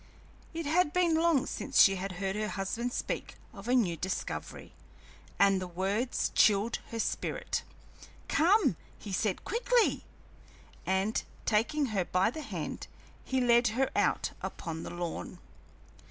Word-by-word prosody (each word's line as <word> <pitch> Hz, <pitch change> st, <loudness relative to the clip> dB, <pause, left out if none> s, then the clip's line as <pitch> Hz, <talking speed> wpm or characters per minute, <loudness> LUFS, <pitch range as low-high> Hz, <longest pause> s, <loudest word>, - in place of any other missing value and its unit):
It 330 Hz, -1 st, -4 dB
had 320 Hz, +1 st, +2 dB
been 355 Hz, -2 st, +3 dB
long 320 Hz, -4 st, +3 dB
since -, -, -1 dB
she 195 Hz, -1 st, +7 dB
had 190 Hz, +1 st, -4 dB
heard 190 Hz, +2 st, -2 dB
her 215 Hz, 0 st, -1 dB
husband 215 Hz, +5 st, -2 dB
speak -, -, -4 dB, 0.2 s
of 200 Hz, 0 st, -10 dB
a 250 Hz, -, +3 dB
new 195 Hz, -9 st, +2 dB
discovery, 185 Hz, +3 st, -5 dB, 0.6 s
and 195 Hz, -1 st, +4 dB
the 185 Hz, -, -4 dB
words 195 Hz, +8 st, -1 dB
chilled 210 Hz, +2 st, +3 dB
her 230 Hz, -, -5 dB
spirit. -, -, -2 dB, 0.7 s
"Come," 390 Hz, +8 st, +3 dB, 0.2 s
he 205 Hz, -, -8 dB
said, 190 Hz, 0 st, -1 dB
"quickly!" 475 Hz, +1 st, +2 dB, 0.8 s
And, 190 Hz, +3 st, +1 dB, 0.2 s
taking 235 Hz, +8 st, +2 dB
her 195 Hz, -3 st, +2 dB
by 185 Hz, +4 st, +1 dB
the 310 Hz, -, -6 dB
hand, 290 Hz, -, -5 dB, 0.4 s
he 260 Hz, -, -1 dB
led 240 Hz, -1 st, +4 dB
her 270 Hz, 0 st, +2 dB
out -, -, +1 dB
upon 165 Hz, -1 st, -5 dB
the -, -, -6 dB
lawn. 175 Hz, -1 st, -5 dB
220 Hz, 140 wpm, -30 LUFS, 190-290 Hz, 0.8 s, she